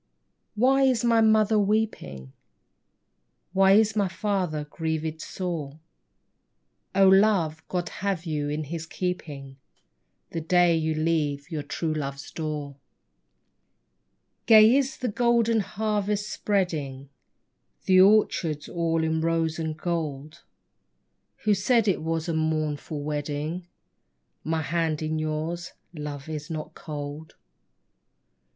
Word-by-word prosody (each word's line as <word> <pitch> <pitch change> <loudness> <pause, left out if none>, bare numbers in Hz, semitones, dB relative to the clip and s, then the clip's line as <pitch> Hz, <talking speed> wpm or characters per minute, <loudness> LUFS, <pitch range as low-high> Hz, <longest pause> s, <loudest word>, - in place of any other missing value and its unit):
Why 260 +5 +4
is 255 -3 +3
my 230 -1 +4
lady 220 - +5
mother 215 0 +4
weeping? 200 - -1 1.2
Why 195 0 +5
is 220 +1 +4
my 205 -2 +2
father 185 -5 -2
grieved 160 0 -3
sore? 160 -6 -5 1.2
Oh, 195 0 +6
love, 190 -5 +4
God 175 -1 -2
have 190 -3 -3
you 150 -3 -2
in 150 +1 -2
His 160 +2 -6
keeping, 145 -7 -5 0.7
The 165 - -3
day 175 +1 +4
you 160 -1 0
leave 155 -3 -1
your 155 -2 -2
true 155 +2 -3
love's 140 -2 -5
door. 150 -3 -5 1.7
THE 230 - +6
BRIDE - - +11
21 - - +8
Gay 260 - +5
is 280 +2 -1
the 255 - -2
golden 235 0 +2
harvest 210 0 -1
spreading, 150 -9 -2 0.7
The 185 0 +6
orchard's 185 -7 +3
all 165 -1 0
in 160 0 0
rose 165 -1 0
and 160 -1 -3
gold; 155 -2 -4 1.0
Who 215 - +4
said 220 +3 +2
it 195 - +1
was 165 +1 -2
a 165 - -1
mournful 155 -2 -2
wedding? 150 +4 -3 0.8
My 160 0 -1
hand 160 0 -1
in 155 0 -1
yours, 155 +3 -3 0.2
Love, 150 -2 -6
is 155 +1 -6
not 155 -2 -5
cold. 150 +1 -7
165 Hz, 125 wpm, -26 LUFS, 155-195 Hz, 1.7 s, BRIDE